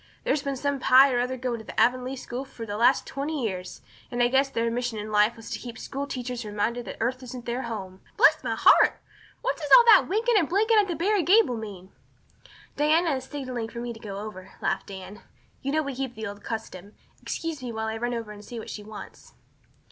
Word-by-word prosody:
There's 290 - +1
been 280 -1 -2
some 285 +1 -1
Pye 265 +2 +6
or 245 - +2
other 250 +1 -1
going 240 -3 -3
to - - -5
Avonlea 250 +3 +2
school 250 0 -5
for 235 -4 -9
the 205 -1 -5
last 240 +5 +3
twenty 285 0 -3
years, 185 -3 -5 0.3
and 245 0 0
I 240 - +4
guess 270 +2 +3
their 230 -3 -1
mission 245 -1 -2
in 210 +1 -5
life 210 +2 +3
was 225 - -10
to - - -3
keep 240 -2 -8
school 280 +1 -5
teachers 250 -2 -4
reminded 215 +3 -2
that - - -7
earth 255 +3 -1
isn't 250 -1 -8
their 240 +2 -2
home. 195 -6 -6 0.2
Bless - - +5
my - - -1
heart! - - +5 0.4
What - - 0
does 295 -3 -5
all 480 - +6
that 435 -4 +7
winking 445 +2 +3
and 325 - -1
blinking 430 +4 +4
at 410 - +3
the 345 - -2
Barry 400 +4 +2
gable 370 - +4
mean?" 200 -4 -8 0.9
"Diana 315 +3 +3
is 260 - -7
signaling 255 -5 -5
for 235 - -7
me 240 0 -4
to 225 - -13
go 200 -3 -7
over," 195 -2 -8
laughed 190 - -2
Anne. 190 +1 -9 0.4
"You 275 - -2
know 310 +1 +1
we 280 -1 -4
keep 260 -1 -4
up - - -28
the 220 - -5
old 205 0 -7
custom. 205 -3 -6 0.3
Excuse 325 -4 -4
me 245 -2 -5
while 220 0 -3
I 220 0 -2
run 240 +1 -2
over 225 -2 -5
and 210 0 -11
see 240 - -8
what 225 - -7
she 210 - -6
wants." 210 0 -11
245 Hz, 230 wpm, -26 LUFS, 220-275 Hz, 0.9 s, that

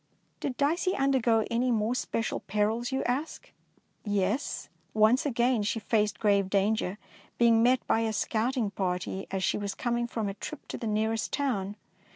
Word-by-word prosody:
Did 265 -3 -3
Dicey 335 +6 +1
undergo 250 -5 +2
any 240 +2 +1
more 225 0 +1
special 230 -2 -2
perils, 220 +5 -1
you 265 - 0
ask? 275 +6 -3 0.5
Yes; 205 +4 -1 0.3
once 220 +6 +4
again 240 -2 +2
she 210 +2 -1
faced 210 -1 0
grave 200 -2 +2
dan 200 +2 +3
ger, 200 -2 -3 0.4
being 230 -1 +5
met 250 +2 +3
by - - +2
a 225 -1 0
scouting 225 +1 0
party 185 0 -2
as 190 -1 -2
she - - +1
was 200 -1 -3
coming 240 -1 -1
from 225 -3 -3
a 195 - -3
trip 270 +9 -8
to - - -4
the 230 - -3
nearest 220 +1 0
town. 210 -9 -1
225 Hz, 170 wpm, -29 LUFS, 205-250 Hz, 0.5 s, being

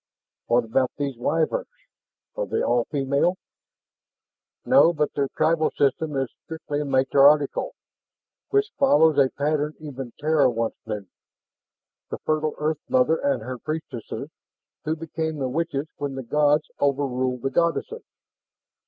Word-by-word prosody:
"What 120 +1 +3
about 125 +3 +1
these 140 -2 -2
Wyverns? 160 - 0 0.7
Are - - -2
they - - -1
all 120 -1 +2
female?" 140 +5 0 1.3
"No, 255 -10 +6
but 150 -2 -1
their 140 -1 0
tribal 155 0 +2
system 145 +2 +1
is 135 -1 0 0.2
strictly 150 -2 -4
matriarchal, 140 - +3 0.7
which 415 +1 +1
follows 160 - +5
a 135 -2 +5
pattern 150 +2 -1
even 135 -5 -7
Terra 150 -2 +3
once 115 -1 -1
knew: 105 -2 -4 1.0
the - - -4
fertile 155 0 0
earth 150 0 -1
mother 130 +6 +3
and 280 -1 -1
her 130 -1 -6
priestesses, 155 -6 -6 0.5
who 155 - 0
became 160 0 -4
the 135 -2 -1
witches 155 0 -2
when 140 -2 -4
the 130 - -5
gods 150 +3 +2
overruled 130 -3 0
the 135 - -1
goddesses. 170 - 0
145 Hz, 130 wpm, -24 LUFS, 135-160 Hz, 1.3 s, No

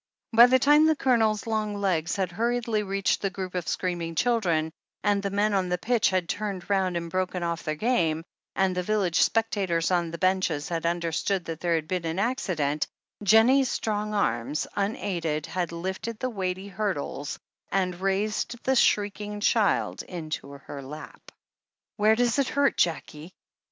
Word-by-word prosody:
By 235 +2 +9
the 260 +1 +5
time 295 +4 +5
the 315 - +4
Coloners 225 -6 +2
long 215 -2 -1
legs 180 -5 0
had 190 -3 -1
hurriedly 230 +1 0
reached 195 -1 0
the 195 - 0
group 185 -1 -6
of 180 -3 -3
screaming 175 -2 -2
children, 170 -8 +1 0.3
and 205 -1 +2
the 200 - -2
men 205 +2 +1
on 190 -2 +1
the 180 - 0
pitch 225 +4 +2
had 185 -2 0
turned 200 -1 -4
round 190 -3 +1
and 170 0 -4
broken 185 +1 -2
off 170 -1 -2
their 155 -1 -2
game, 165 -6 +1 0.3
and 190 -1 +1
the 180 - 0
village 190 -3 +1
spectators 195 -7 +1
on 175 -2 +1
the 170 - -6
benches 185 -5 0
had 170 -1 -2
imderstood 170 +2 -1
that 165 -1 -5
there 170 -1 +1
had 155 -1 -2
been 180 -1 -2
an 165 +2 -3
accident, 185 - 0 0.3
Jennie's 230 +6 +5
strong 210 -1 -2
arms, 150 - 0
unaided, 170 -7 -1
had 170 +1 -3
lifted 190 +6 -4
the 255 +2 -3
weighty 190 -2 -3
hurdles 185 -8 -3 0.3
and 185 -2 -1
raised 200 +4 0
the 265 - +2
shrieking 205 -2 +1
child 210 0 +1
into 155 -5 -6
her 140 0 -9
lap. 150 +3 -10 0.7
"Where 215 +1 +4
does 245 +2 +1
it 275 - +2
hurt, 285 -1 +2
Jackie 165 0 -2
190 Hz, 165 wpm, -26 LUFS, 170-215 Hz, 0.7 s, By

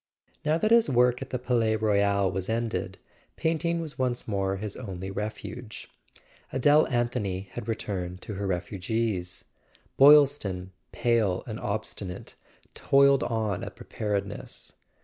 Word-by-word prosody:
Now 155 +1 +2
that 215 +6 0
his 230 -7 +5
work 125 0 +3
at 135 - -6
the 125 - -2
Palais 120 -3 +1
Royal 100 -3 +2
was 95 +1 -4
ended, 115 0 -2 0.4
painting 165 +1 0
was 155 -4 -6
once 125 -1 -1
more 95 -2 0
his 105 0 -5
only 95 -5 -6
refuge. 110 +3 -6 0.6
Adele 145 +4 +4
Anthony 105 -6 -1
had 115 +2 -7
returned 90 -5 -3
to 105 - -6
her 100 0 -3
refugees; 95 +1 -2 0.5
Boyl 145 +1 +9
ston, 95 -10 -5 0.2
pale 115 -6 +1
and 110 -2 -6
obstinate, 100 -2 -4 0.4
toiled 140 0 +4
on 110 -4 -1
at - - -7
Preparedness. 100 -1 -4
110 Hz, 130 wpm, -27 LUFS, 100-125 Hz, 0.6 s, Boyl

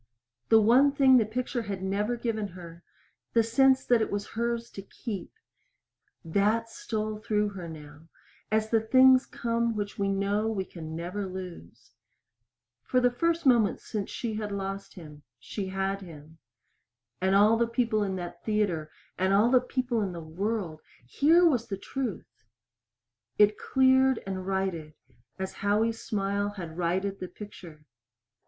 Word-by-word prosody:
The 225 - +7
one 250 +6 +5
thing 270 -2 +5
the 220 -3 +2
picture 245 +2 -2
had 200 -4 -5
never 205 +5 -1
given 220 -3 -2
her 170 -1 -11 0.5
the 230 - +4
sense 265 +4 +3
that 240 -2 +3
it - - 0
was 205 0 -3
hers 235 0 -2
to 195 - -8
keep 200 -1 -7 0.9
that 210 +7 +1
stole 215 -1 -4
through 210 -1 0
her 185 -4 -8
now 150 0 -12 0.4
as 220 0 +1
the 225 -1 +3
things 260 +3 +5
come 230 -1 -1
which 205 -1 -4
we 200 0 +1
know 200 +2 0
we 205 -4 -2
can 160 -3 -8
never 180 +4 -4
lose. 185 -1 -9 0.9
For 255 - +1
the 245 0 +3
first 335 +5 0
moment 235 -6 +4
since 205 -3 -5
she 230 -3 -4
lost 200 -2 -4
him, 150 -4 -11 0.2
she 195 - -5
had 195 +1 -2
him. 160 -3 -13 0.8
And 190 +1 +2
all 210 +3 +6
the 235 +1 +1
people 230 -2 0
in 195 -2 -1
that 175 -2 -7
theater, 200 -8 0 0.3
and 190 +1 +3
all 220 +4 +4
the 255 -1 +5
people 250 -2 -1
in 190 -3 -2
the 170 - -6
world 170 0 -3 0.2
here 320 - +4
was 245 -7 +1
the 195 - -4
truth! 265 +5 -6 0.9
It 210 0 +5
cleared 260 0 +3
and 190 -1 -5
righted 185 -6 -2 0.4
as 190 0 -4
Howie's 220 +3 +1
smile 200 0 -1
had 165 -4 -7
righted 185 +3 -1
the 185 - -5
picture. 175 -7 -12
205 Hz, 155 wpm, -28 LUFS, 190-230 Hz, 0.9 s, The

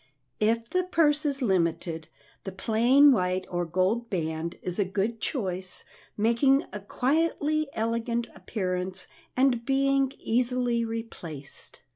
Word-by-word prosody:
If 225 +2 +1
the 365 +7 0
purse 305 -4 +2
is 275 -2 -1
limited, 170 -5 0 0.4
the 195 - -5
plain 235 +9 +5
white 185 -5 +1
or 175 0 -1
gold 190 +7 0
band 165 -2 -3
is 180 +2 -1
a - - +5
good 205 +4 -2
choice, 185 - -3 0.3
making 235 +6 +3
a 210 - -4
quietly 305 +6 0
elegant 230 +1 -1
appearance 185 -2 -3 0.3
and 255 -3 +3
being 275 +1 +2
easily 245 0 +1
replaced. 225 -11 -7
230 Hz, 120 wpm, -27 LUFS, 185-265 Hz, 0.4 s, plain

